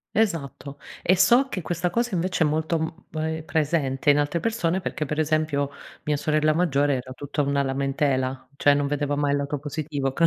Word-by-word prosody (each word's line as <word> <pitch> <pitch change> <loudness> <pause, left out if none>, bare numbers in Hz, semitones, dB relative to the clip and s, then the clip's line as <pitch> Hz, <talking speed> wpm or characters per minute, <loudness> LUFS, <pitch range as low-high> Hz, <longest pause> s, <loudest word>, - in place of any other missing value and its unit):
Esatto. 150 -9 -1 0.3
E 185 - +4
so 235 +9 +5
che 195 -8 -4
questa 175 +1 -1
cosa 235 +4 -1
invece 180 0 +1
è - - +3
molto, 160 +2 0
mhmm, 160 +1 -2 0.3
ehm, 160 0 -2
presente 150 -4 0
in 145 - +6
altre 145 +3 0
persone 190 -6 0
perché 155 - -3
per 150 +2 -3
esempio 155 -2 +1 0.3
mia 150 -1 0
sorella 155 +1 +2
maggiore 145 -4 +2
era 130 0 -6
tutta 145 +2 -3
una 140 0 +1
lamentela, 135 -1 -1
cioè 145 0 +5
non 140 0 +1
vedeva 145 0 -1
mai 145 0 +1
il 145 - +2
lato 140 +1 -2
positivo, 145 -1 -3
c 135 - -7
150 Hz, 195 wpm, -25 LUFS, 140-165 Hz, 0.3 s, in